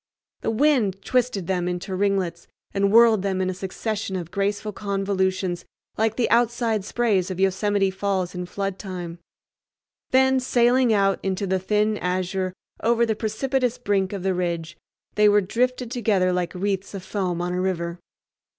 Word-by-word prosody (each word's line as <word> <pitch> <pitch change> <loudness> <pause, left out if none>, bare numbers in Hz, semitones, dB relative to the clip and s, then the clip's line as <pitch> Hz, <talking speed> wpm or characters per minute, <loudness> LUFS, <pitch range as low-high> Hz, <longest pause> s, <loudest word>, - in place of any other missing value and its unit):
The - - -1
wind 225 -6 +2
twisted 250 -7 0
them 180 -1 -1
into 180 +2 -3
ringlets 185 -3 -1 0.3
and 200 0 +2
whirled 225 -2 +6
them 190 -1 -1
in 185 0 0
a - - -4
succession 195 +2 -4
of 175 -2 -5
graceful 205 +1 -1
convolutions 190 -3 -1 0.3
like 220 0 +1
the 245 - +1
outside 235 -2 +2
sprays 205 -4 +1
of 185 -1 -5
Yosemite 195 +1 +2
Falls 190 -2 -1
in 180 -1 -5
flood 195 0 -3
time; 175 -3 -6 0.9
then, 265 0 +4
sailing 245 0 +3
out 195 -2 +3
into 195 +1 -1
the 190 0 0
thin 210 +2 +1
azure 185 +1 -1 0.3
over 235 +1 +3
the 220 -1 0
precipitous 250 +3 -1
brink 200 -5 0
of 195 -3 -5
the 190 0 +1
ridge 170 -2 -2 0.4
they 210 0 +5
were 205 0 +5
drifted 245 +4 -1
together 200 -7 +1
like 180 0 -2
wreaths 195 +1 -2
of 190 - -6
foam 185 -3 -2
on 175 0 -2
a 180 - -1
river. 170 -2 -2
195 Hz, 160 wpm, -24 LUFS, 185-220 Hz, 0.9 s, whirled